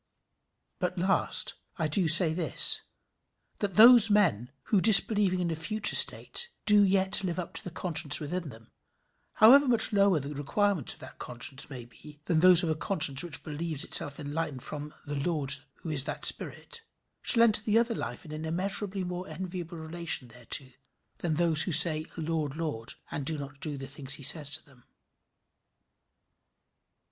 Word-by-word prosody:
But 180 Hz, +1 st, -5 dB
last, 190 Hz, +2 st, -2 dB, 0.2 s
I 160 Hz, -3 st, -3 dB
do 165 Hz, +3 st, -1 dB
say 160 Hz, 0 st, +7 dB
this, 165 Hz, -1 st, +5 dB, 0.8 s
that 200 Hz, -3 st, -5 dB
those 230 Hz, 0 st, +7 dB
men, 170 Hz, -, -1 dB
who, 205 Hz, -4 st, -2 dB
disbelieving 205 Hz, -3 st, +7 dB
in 170 Hz, -1 st, -4 dB
a -, -, -5 dB
future 210 Hz, +7 st, 0 dB
state, 475 Hz, 0 st, +4 dB, 0.2 s
do 210 Hz, -1 st, +4 dB
yet 190 Hz, +1 st, +2 dB
live 175 Hz, -2 st, -5 dB
up 180 Hz, -, -8 dB
to -, -, -6 dB
the -, -, -9 dB
conscience 165 Hz, -4 st, +1 dB
within 160 Hz, +2 st, -7 dB
them, 115 Hz, -2 st, -17 dB, 0.6 s
however 270 Hz, +6 st, +4 dB
much 235 Hz, -2 st, +3 dB
lower 200 Hz, -4 st, +1 dB
the 140 Hz, +1 st, -9 dB
requirements 165 Hz, -, -3 dB
of -, -, -20 dB
that 130 Hz, -, -15 dB
conscience 130 Hz, +4 st, -2 dB
may 125 Hz, -4 st, -11 dB
be 150 Hz, +5 st, -18 dB
than 160 Hz, -1 st, -2 dB
those 180 Hz, +1 st, +4 dB
of 165 Hz, -, -4 dB
a -, -, -1 dB
conscience 155 Hz, -4 st, +4 dB
which 170 Hz, -4 st, -5 dB
believes 155 Hz, -1 st, -7 dB
itself 140 Hz, +1 st, -3 dB
enlightened 150 Hz, -2 st, -7 dB
from 150 Hz, 0 st, -9 dB
"the 145 Hz, -1 st, -7 dB
Lord, 145 Hz, -3 st, -4 dB, 0.3 s
who 165 Hz, -, -7 dB
is 140 Hz, -3 st, 0 dB
that -, -, -4 dB
spirit," 470 Hz, -, -2 dB, 0.4 s
shall 230 Hz, -2 st, +2 dB
enter 215 Hz, -3 st, +2 dB
the 215 Hz, 0 st, -2 dB
other 230 Hz, 0 st, -1 dB
life 210 Hz, -, -9 dB
in 155 Hz, -, -13 dB
an 155 Hz, +1 st, -9 dB
immeasurably 190 Hz, +4 st, -4 dB
more 180 Hz, +1 st, -8 dB
enviable 175 Hz, +1 st, -9 dB
relation 160 Hz, -5 st, -5 dB
thereto 125 Hz, +3 st, -6 dB, 0.5 s
than 165 Hz, -3 st, -4 dB
those 165 Hz, -1 st, 0 dB
who 170 Hz, -, -1 dB
say 155 Hz, 0 st, +4 dB
Lord, 155 Hz, -3 st, -6 dB
Lord, 150 Hz, -9 st, -8 dB, 0.2 s
and 145 Hz, -, -7 dB
do 155 Hz, +3 st, -2 dB
not 140 Hz, 0 st, -12 dB
the 150 Hz, -3 st, -3 dB
things 140 Hz, 0 st, -6 dB
he 140 Hz, -, -13 dB
says 145 Hz, +1 st, -2 dB
to -, -, -4 dB
them. 130 Hz, -4 st, -25 dB
165 Hz, 170 wpm, -26 LUFS, 145-190 Hz, 0.8 s, say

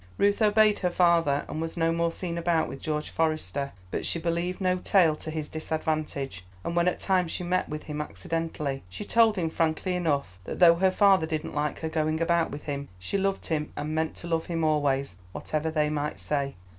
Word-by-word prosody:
Ruth 205 Hz, +2 st, +2 dB
obeyed 215 Hz, 0 st, +4 dB
her 180 Hz, -, +1 dB
father, 170 Hz, -5 st, +3 dB
and 155 Hz, -, -4 dB
was 165 Hz, +1 st, -4 dB
no 165 Hz, 0 st, +2 dB
more 170 Hz, 0 st, +1 dB
seen 170 Hz, 0 st, -4 dB
about 170 Hz, -1 st, +1 dB
with 135 Hz, -, -8 dB
George 150 Hz, -1 st, -2 dB
Forester; 150 Hz, -, -1 dB, 0.2 s
but -, -, -2 dB
she -, -, -1 dB
believed 170 Hz, +2 st, -1 dB
no 185 Hz, -1 st, +2 dB
tale 175 Hz, -5 st, +4 dB
to 155 Hz, -, -7 dB
his 155 Hz, -1 st, -3 dB
disadvantage, 155 Hz, -, -3 dB, 0.2 s
and 170 Hz, -, -3 dB
when 175 Hz, +1 st, +3 dB
at 180 Hz, -, +1 dB
times 180 Hz, -4 st, +1 dB
she -, -, -3 dB
met 180 Hz, +1 st, 0 dB
with 150 Hz, 0 st, -5 dB
him 150 Hz, -1 st, -4 dB
accidentally, 150 Hz, -3 st, -3 dB
she 95 Hz, -, -7 dB
told 225 Hz, 0 st, +4 dB
him 165 Hz, -4 st, -1 dB
frankly 165 Hz, +3 st, 0 dB
enough 140 Hz, -, -1 dB
that -, -, -5 dB
though 175 Hz, -2 st, +8 dB
her 190 Hz, +2 st, +4 dB
father 190 Hz, -3 st, +4 dB
didn't 155 Hz, 0 st, -3 dB
like 150 Hz, 0 st, -2 dB
her 160 Hz, -, -1 dB
going 155 Hz, 0 st, 0 dB
about 170 Hz, 0 st, +2 dB
with 145 Hz, -, -7 dB
him, 140 Hz, -1 st, -4 dB
she 90 Hz, -, -2 dB
loved 195 Hz, 0 st, -1 dB
him 150 Hz, -2 st, -2 dB
and 150 Hz, +1 st, -3 dB
meant 160 Hz, 0 st, -1 dB
to 175 Hz, -, -7 dB
love 165 Hz, -1 st, -1 dB
him 165 Hz, -2 st, -1 dB
always, 140 Hz, -, +1 dB, 0.2 s
whatever 155 Hz, +1 st, -2 dB
they 155 Hz, -1 st, +1 dB
might 150 Hz, 0 st, -2 dB
say. 140 Hz, -2 st, -1 dB
160 Hz, 210 wpm, -27 LUFS, 150-175 Hz, 0.2 s, though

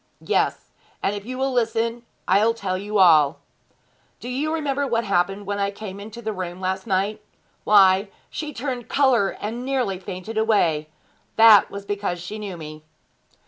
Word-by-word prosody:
'Yes; -, -, -1 dB, 0.3 s
and 200 Hz, -, 0 dB
if 205 Hz, +1 st, -8 dB
you 255 Hz, 0 st, -5 dB
will 265 Hz, +1 st, 0 dB
listen 230 Hz, 0 st, 0 dB, 0.3 s
I'll 215 Hz, +4 st, +3 dB
tell 195 Hz, -5 st, -3 dB
you 205 Hz, +3 st, -3 dB
all. 155 Hz, -7 st, +5 dB, 0.8 s
Do 245 Hz, -, -7 dB
you 285 Hz, +5 st, -1 dB
remember 285 Hz, -3 st, -1 dB
what 235 Hz, -2 st, 0 dB
happened 195 Hz, 0 st, 0 dB
when 205 Hz, +1 st, -3 dB
I 200 Hz, 0 st, +1 dB
came 200 Hz, -1 st, -8 dB
into 220 Hz, +3 st, -9 dB
the 220 Hz, 0 st, -2 dB
room 180 Hz, -2 st, -6 dB
last 190 Hz, +2 st, -3 dB
night? 200 Hz, +2 st, 0 dB, 0.4 s
Why, 195 Hz, -1 st, +5 dB, 0.2 s
she 305 Hz, -1 st, -5 dB
turned 250 Hz, -2 st, -5 dB
colour 255 Hz, -8 st, +2 dB
and 230 Hz, +4 st, -4 dB
nearly 255 Hz, -8 st, -1 dB
fainted 195 Hz, +4 st, -5 dB
away. 165 Hz, -9 st, +1 dB, 0.5 s
That 220 Hz, -3 st, +7 dB
was 200 Hz, 0 st, -8 dB
because 200 Hz, -3 st, -3 dB
she 195 Hz, +5 st, -7 dB
knew 200 Hz, -4 st, -6 dB
me.' 155 Hz, -1 st, -9 dB
205 Hz, 165 wpm, -23 LUFS, 190-235 Hz, 0.8 s, That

